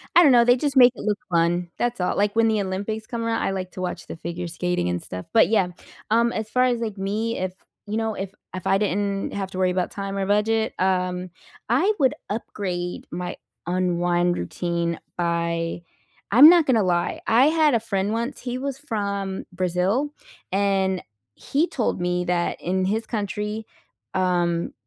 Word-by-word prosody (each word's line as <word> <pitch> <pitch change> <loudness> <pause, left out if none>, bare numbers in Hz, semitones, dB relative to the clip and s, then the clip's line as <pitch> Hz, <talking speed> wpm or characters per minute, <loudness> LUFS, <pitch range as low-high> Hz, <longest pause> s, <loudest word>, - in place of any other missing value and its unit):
I 350 - +9
don't 285 - +7
know, 240 -1 +6
they 245 - +6
just 275 +1 -1
make 250 -1 +8
it - - -8
look 210 -1 0
fun, 175 0 +1
that's 240 -3 -1
all, 180 - 0
like 205 0 +1
when 230 0 +4
the 215 -2 +2
Olympics 200 +3 -3
come 235 -1 -4
around, 230 0 0
I - - 0
like 185 -1 -4
to 185 - -6
watch 180 -1 -4
the - - -6
figure 170 +1 -5
skating 180 - -1
and 90 0 -2
stuff. 90 0 -7
But 225 - +5
yeah, 200 -5 +3 0.4
um, 235 +1 +4
as 220 0 -4
far 255 0 +2
as, 245 -2 +2
like, 220 -3 -4
me, 215 +4 -2
if 185 0 -2 0.3
you 210 +2 -2
know, 225 -1 -1
if 195 0 -5 0.2
if 185 - -6
I 195 - +4
didn't 200 0 -1
have 195 -1 -4
to 185 - -7
worry 185 -1 +2
about 180 0 -1
time 195 0 -4
or 195 - 0
budget, 220 +2 +1
um, 185 -1 0 0.4
I 410 - +3
would 265 0 +4 0.2
upgrade 185 -4 -4
my 180 +1 -4 0.3
unwind 175 -1 +1
routine 170 - -2 0.2
by 170 0 -1 0.5
I'm 260 +8 +10
not 340 -2 +6
gonna 230 -5 +4
lie, 175 -2 0
I 245 +5 +5
had 310 -2 +3
a - - +3
friend 200 -1 -1
once, 235 +4 -3
he 245 -1 -3
was 275 0 -3
from 200 -7 -3
Brazil, 185 +11 0 0.4
and 195 -1 +1 0.3
he 305 +5 0
told 235 - -1
me 180 0 0
that 175 -1 0
in 185 +1 0
his 220 +4 -1
country, 210 0 -3 0.5
um, 175 -2 0
195 Hz, 190 wpm, -24 LUFS, 180-225 Hz, 0.5 s, I'm